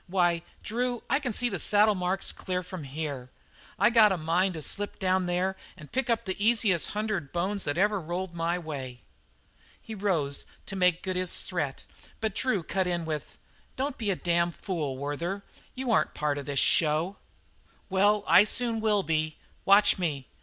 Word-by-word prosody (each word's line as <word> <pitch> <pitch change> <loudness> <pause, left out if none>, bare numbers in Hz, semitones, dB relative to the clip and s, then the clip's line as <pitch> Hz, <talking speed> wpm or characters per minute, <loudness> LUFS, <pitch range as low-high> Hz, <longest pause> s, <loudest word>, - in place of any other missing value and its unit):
Why, 175 -2 +2 0.2
Drew, 245 +1 -2
I 275 - +4
can 260 -4 -2
see 245 +3 0
the - - -3
saddle 210 +1 +4
marks 185 0 0
clear 185 -1 -3
from 180 -4 -7
here; 140 -3 -5 0.5
I - - +4
got 220 -3 +6
a 190 - +1
mind 175 +3 +1
to 155 - -5
slip 205 +6 -2
down 185 -1 +1
there 180 +2 0 0.2
and 155 -4 -13
pick 265 0 -1
up 230 -1 +1
the 190 +1 -3
easiest 220 -6 +2
hundred 210 -9 -2
bones 190 +3 -1
that 145 - -1
ever 205 +1 +2
rolled 175 +2 -4
my 170 +1 -1
way." 135 -7 -7 0.8
He 220 - -9
rose 175 -9 -1 0.2
to 195 - -6
make 180 -2 +2
good 185 -1 -2
his 185 -1 0
threat, 150 -7 -3 0.4
but 220 -2 -1
Drew 215 -8 +1
cut 190 +2 -1
in 175 -2 -1
with: 155 -2 -5 0.4
"Don't 275 0 -3
be 215 -3 -1
a 195 - +2
damn 170 0 +1
fool, 155 -7 -4
Werther. 170 +8 -3 0.3
You 255 -2 -2
aren't - - +2
part 150 -1 -1
of 140 - -8
this 140 -1 -3
show." 160 +7 +3 0.7
"Well, 200 +2 +3
I 205 - +7
will 220 -4 +1
be 155 -2 0
soon. - - -29 0.3
Watch 200 0 +6
me! 145 -7 -2
185 Hz, 180 wpm, -28 LUFS, 160-205 Hz, 0.8 s, I